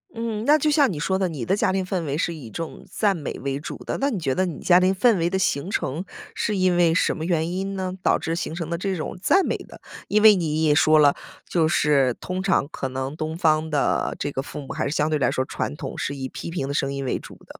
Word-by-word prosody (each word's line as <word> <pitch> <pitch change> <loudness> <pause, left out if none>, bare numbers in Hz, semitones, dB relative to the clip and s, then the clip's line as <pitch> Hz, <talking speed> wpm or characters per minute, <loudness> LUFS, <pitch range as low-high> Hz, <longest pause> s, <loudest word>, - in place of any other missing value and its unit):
嗯， 225 -2 -3
那 295 +3 +6
就 305 0 +1
像 285 -5 +4
你 155 - -5
说 190 +5 0
的， 190 -2 +1
你 140 -8 -5
的 195 - +2
家 200 - +1
庭 190 0 -1
氛 185 -2 -2
围 145 -2 -2
是 170 +1 -1
以 150 -7 -9
一 - - -10
种 165 +8 -6
赞 205 -3 +1
美 150 -5 -5
为 140 0 -2
主 150 - -7
的。 - - -2
那 280 - +2
你 220 -8 -2
觉 135 -5 0
得 185 - +1
你 165 -5 -5
家 180 0 +5
庭 185 +1 +3
氛 215 +3 +3
围 170 +1 +1
的 190 - 0
形 175 -3 0
成 160 -3 -2 0.3
是 210 - -1
因 185 -1 +3
为 170 -2 +3
什 - - +2
么 160 - -5
原 165 -1 0
因 195 +2 -3
呢？ 185 -1 -3
导 - - +3
致 165 - -3
形 165 -1 -4
成 165 -1 -5
的 - - +1
这 190 +2 -2
种 155 - -4
赞 385 - +4
美 - - 0
的。 - - -11 0.3
因 215 +1 +2
为 215 -1 +9
你 160 -3 -1
也 155 -2 +4
说 155 +1 +5
了， 145 -2 +5 0.3
就 165 -3 +2
是 140 -5 +2
通 185 0 -4
常 190 -7 +1
可 135 - -4
能 130 +2 -4
东 155 +1 -4
方 160 -2 +2
的 145 -2 0
这 145 - -3
个 135 - -2
父 145 - -8
母 135 - -11
还 - - -2
是 150 - -3
相 150 - +2
对 155 - +1
来 140 - +2
说 130 - -1
传 145 - -4
统 - - -6
是 140 - -3
以 135 -1 -4
批 130 - -7
评 165 -5 -3
的 140 - -3
声 135 -1 0
音 140 -1 -4
为 130 - -1
主 - - -12
的。 - - -14
165 Hz, 305 characters per minute, -23 LUFS, 145-190 Hz, 0.3 s, 为